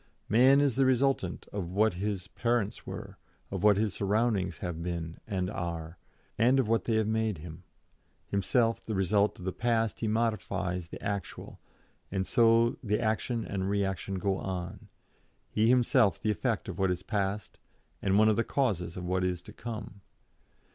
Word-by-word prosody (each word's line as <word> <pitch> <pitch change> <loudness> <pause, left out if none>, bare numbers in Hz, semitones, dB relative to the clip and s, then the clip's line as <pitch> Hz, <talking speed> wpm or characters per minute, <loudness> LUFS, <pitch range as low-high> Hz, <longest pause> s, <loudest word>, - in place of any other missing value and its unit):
Man 130 +6 +6
is 135 -4 +1
the 135 - +4
resultant 130 -8 +1
of 95 -4 -3
what 105 +3 +2
his 95 0 -3
parents 115 -3 -1
were, - - -7 0.3
of 95 -2 -3
what 105 -1 +5
his 105 -2 0
surroundings 100 -3 0
have 85 -2 -4
been 85 -1 -4
and 95 -4 -1
are, 85 -4 -5 0.4
and 125 +4 +5
of 130 - +2
what 115 +1 +1
they 115 - +1
have 110 -1 +2
made 110 -3 0
him; 80 +2 -9 0.6
himself 115 +4 +1
the 110 - -3
result 100 +2 +2
of 90 - -9
the 95 - -2
past 115 -2 0
he 110 - -1
modifies 100 -5 -1
the - - -9
actual, 100 -3 -5 0.5
and 95 0 -1
so 115 +1 +4
the 105 -3 0
action 115 +1 -1
and 95 -1 -2
reaction 100 -1 -1
go 95 0 0
on, 90 -2 -5 0.6
he 110 +1 +3
himself 125 - +4
the 110 - 0
effect 115 0 -1
of 95 -1 -6
what 95 -1 +2
is 90 0 -2
past, 100 -1 -2 0.4
and 95 0 +2
one 110 +1 +6
of 110 - +3
the 115 - +3
causes 95 -13 -1
of 90 - -5
what 90 +1 0
is 90 -1 0
to 105 - -11
come. 110 -3 -7
100 Hz, 175 wpm, -30 LUFS, 95-115 Hz, 0.6 s, Man